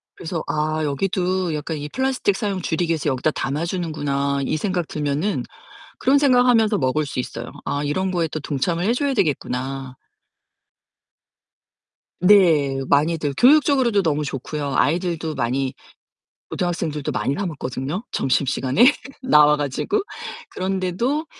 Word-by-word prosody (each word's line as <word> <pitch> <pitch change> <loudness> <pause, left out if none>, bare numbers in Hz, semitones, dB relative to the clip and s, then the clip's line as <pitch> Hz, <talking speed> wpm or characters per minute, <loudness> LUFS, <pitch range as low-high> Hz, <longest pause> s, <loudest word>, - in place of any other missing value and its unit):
그래서 165 -1 -4
'아 155 +1 -1
여기도 180 +3 -1
약간 155 +1 -4
이 145 0 -6
플라스틱 260 - 0
사용 200 -3 -2
줄이기 165 0 -1
위해서 155 -2 0
여기다 135 +4 0
담아 145 +5 -2
주는구나.' 145 -6 -1
이 - - -1
생각 180 -1 -1
들면은 150 +6 -1 0.6
그런 275 +2 +4
생각 255 -3 +4
하면서 225 -3 +4
먹을 145 +3 0
수 140 - -4
있어요. 120 -1 -5
'아 145 +1 -1
이런 185 +6 -1
거에 170 -3 0
또 155 - -4
동참을 165 +5 -1
해 230 - +3
줘야 275 +2 0
되겠구나.' 135 - -2 2.3
네. 165 -8 +5
많이들 150 0 +1
교육적으로도 260 - +4
너무 150 -2 0
좋고요. 140 +1 -4
아이들도 165 -1 0
많이 130 +2 -1 0.8
고등학생들도 165 -5 -2
많이 135 - -1
사 195 +5 -3
먹거든요 145 - -4
점심시간에 135 - +1 0.4
나와 150 -9 +5
가지고. 150 - -1 0.5
그런데도 190 - -1
160 Hz, 320 characters per minute, -22 LUFS, 145-190 Hz, 2.3 s, 네